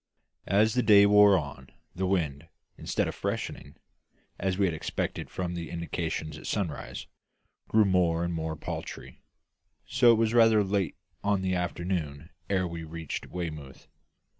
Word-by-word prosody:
As 105 +4 +3
the 125 - +2
day 105 -3 +7
wore 105 -1 +7
on, 70 -4 -6 0.2
the 95 +1 -2
wind, 80 -5 -1 0.3
instead - - -1
of - - -3
freshening, - - -4 0.6
as 95 -1 -1
we 100 - +3
had 90 - 0
expected 80 - -3
from 90 -1 -3
the 85 -1 -5
indications 80 -2 -4
at - - -9
sunrise, 95 -8 -3 0.6
grew 110 -1 +4
more 90 -3 +2
and 85 0 -2
more 80 -1 -3
paltry; - - -7 0.6
so 130 -2 +3
that 120 - +9
it - - +2
was 115 0 +1
rather 115 -3 +5
late 95 -4 -1 0.3
on 100 0 +2
in 95 - -2
the 95 0 0
afternoon 85 -4 -3 0.2
ere 95 -2 +1
we 85 -1 -6
reached 80 -1 -6
Weymouth. 75 -7 -6
90 Hz, 160 wpm, -28 LUFS, 80-100 Hz, 0.6 s, that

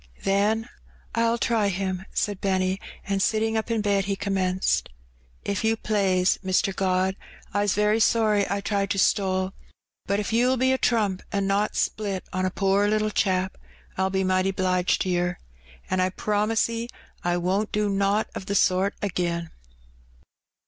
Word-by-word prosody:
"Then 210 +4 +1 0.5
I'll 230 0 +2
try 225 -3 +1
Him/' 190 0 -3
said 205 -3 -2
Benny, 190 0 0 0.2
and, 195 0 -1
sitting 220 +2 +1
up 220 +1 -1
in 225 -2 +1
bed, 200 -2 +1
he 200 0 -1
commenced 185 - 0 0.3
— 60 0 -34
"If 200 - -3
you 225 0 +2
plaise, 195 -4 +1
Mr. 190 +1 +1
God, 185 0 +1 0.4
I's 205 -1 +1
very 210 +2 +2
sorry 215 -3 +3
I 200 0 -1
tried 200 -1 -1
to 200 - -1
stole; 190 0 +1 0.5
but 200 +1 +1
if 210 +1 -3
you'll 250 +3 +3
be 260 +1 +3
a 260 - +1
trump 210 -5 +1
an' 200 -1 0
not 200 +2 0
split 200 -3 -1
on 185 0 0
a - - 0
poor 195 +2 +2
little 215 0 +1
chap, 190 -2 0 0.4
Fll 190 0 0
be 190 0 +1
mighty 185 0 +2
'bliged 185 -1 +1
to 185 - -1
yer. 175 0 0 0.5
An' 185 - -1
I 185 0 +2
promise 210 +3 0
'e 230 0 -4 0.4
I 175 0 +1
won't 190 +4 0
do 210 0 +1
nowt 200 +2 +1
o' - - -2
the 200 +1 -4
sort 190 +1 +2
agin." 170 -3 -2
195 Hz, 170 wpm, -25 LUFS, 185-210 Hz, 0.5 s, sorry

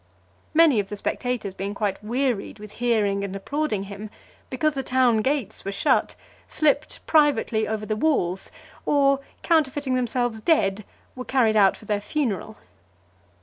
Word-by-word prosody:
Many 315 -8 +6
of 200 - -3
the 210 - -4
spectators 240 -2 -3
being 200 +2 -5
quite 205 -1 -2
wearied 240 -2 -1
with 210 -1 -10
hearing 210 -5 +1
and 195 -1 -4
applauding 220 0 -2
him, 200 +2 -8 0.4
because 305 +4 0
the 270 - -2
town 255 -3 +2
gates 240 -2 -1
were 195 - -3
shut, 195 - +1 0.3
slipped 300 -1 0
privately 255 -8 +2
over 215 -1 -3
the 215 - -1
walls; 205 - 0 0.3
or 275 -1 +3 0.2
counterfeiting 290 -4 +1
themselves 245 -2 -1
dead, 215 - +2 0.3
were 255 - -5
carried 235 -5 +2
out 195 -3 +4
for - - -15
their 205 -1 -1
funeral. 220 -3 -2
225 Hz, 150 wpm, -24 LUFS, 205-275 Hz, 0.4 s, Many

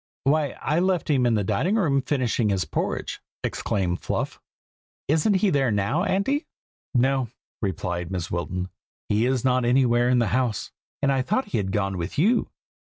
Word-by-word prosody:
"Why, 145 0 +1
I 150 +4 +1
left 180 -3 +1
him 130 -4 +3
in 115 - +3
the 105 - +1
dining 180 - +1
room, 145 -11 +2
finishing 125 -5 0
his 95 -2 0
porridge!" - - -3 0.2
exclaimed 90 -3 -1
Fluff. - - -3 0.7
"Isn't 160 +8 +3
he 195 0 +3
there 135 -3 +2
now, 110 - +1
Auntie?" 245 - 0 0.5
"No!" 130 0 +2 0.3
replied 90 -3 -2
Mrs. 90 -3 -4
Wilton. 90 +1 -2 0.4
"He 110 +3 +2
is 130 -1 0
not 130 -1 +3
anywhere 120 -1 +3
in 125 - +4
the 120 -4 +2
house, 125 -4 0 0.3
and 140 - +4
I 135 -1 +2
thought 215 - -1
he - - -1
had 95 -2 -2
gone 95 -2 -1
with 85 +2 -4
you. 220 - +3
125 Hz, 170 wpm, -25 LUFS, 100-150 Hz, 0.7 s, in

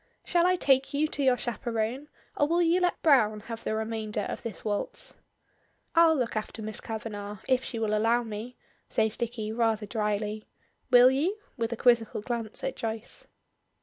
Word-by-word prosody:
Shall 345 0 +3
I 365 - +4
take 270 -3 +2
you 305 +2 +2
to 290 - -3
your 260 -2 +4
chaperone, 235 +3 -2 0.3
or 290 - +2
will 340 +2 +3
you 340 +2 +3
let 355 -1 +1
Browne 215 -9 +4
have 230 +1 -7
the 215 - -1
remainder 220 -1 -2
of - - -4
this 220 -5 -7
waltz?" 205 -1 -1 0.8
"I'll 330 -1 +6
look 245 -6 -1
after 215 +1 -4
Miss 215 0 -5
Kavanagh, 210 -2 -5
if 260 0 +2
she 235 - -5
will 215 -1 0
allow 230 +3 +3
me," 225 +2 -7 0.3
says 220 0 +1
Dicky, 230 -2 -3
rather 225 -2 +1
drily. 210 0 -2 0.4
"Will 250 0 +8
you?" 325 +10 0 0.2
with 230 -3 -2
a 235 - -3
quizzical 230 -3 +3
glance 230 - -4
at - - -2
Joyce. 225 0 -5
230 Hz, 175 wpm, -28 LUFS, 215-265 Hz, 0.8 s, Will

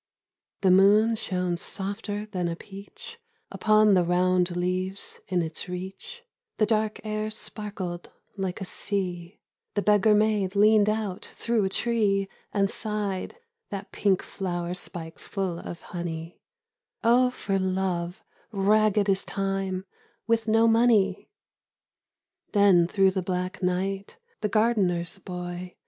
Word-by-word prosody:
The 190 -2 +4
moon 205 +4 +5
shone 180 -4 -2
softer 205 +3 -3
than 185 -5 -2
a 170 - -2
peach 200 - -11 0.3
Upon 215 -1 +4
the 180 -2 +4
round 180 0 +2
leaves 185 +2 -2
in 180 -2 +1
its 160 +3 -5
reach; 190 - -7 0.3
The 215 - +4
dark 215 0 0
air 215 0 -2
sparkled 205 -5 -5 0.3
like 190 -2 -3
a 195 - -4
sea— 180 -2 -3 0.4
The 205 - +1
beggar 210 +1 +5
maid 210 -2 +1
leaned 210 0 +5
out 215 -3 -2
through 230 -4 -1
a - - 0
tree 205 -3 +1 0.2
And 200 -1 +2
sighed 210 - -3 0.3
(that 200 -1 -6
pink 195 -2 +1
flower 175 -2 -3
spike 165 -2 -5
full 190 -4 -3
of 170 - -8
honey), 170 -1 -6 0.6
"Oh, 245 +2 +5
for 195 -6 -2
Love, 185 -2 -2 0.3
ragged 210 0 +3
as 195 -1 +2
Time, 195 -1 -2 0.4
with 230 -1 +1
no 225 +1 +4
money! 225 -4 +3 0.6
" - - -52
Then 195 -5 +5
through 195 +1 +3
the 190 0 -1
black 180 +1 -3
night 195 - -2 0.2
the 210 - -1
gardener's 195 -5 +1
boy. 180 -1 -6
195 Hz, 130 wpm, -26 LUFS, 180-215 Hz, 0.6 s, moon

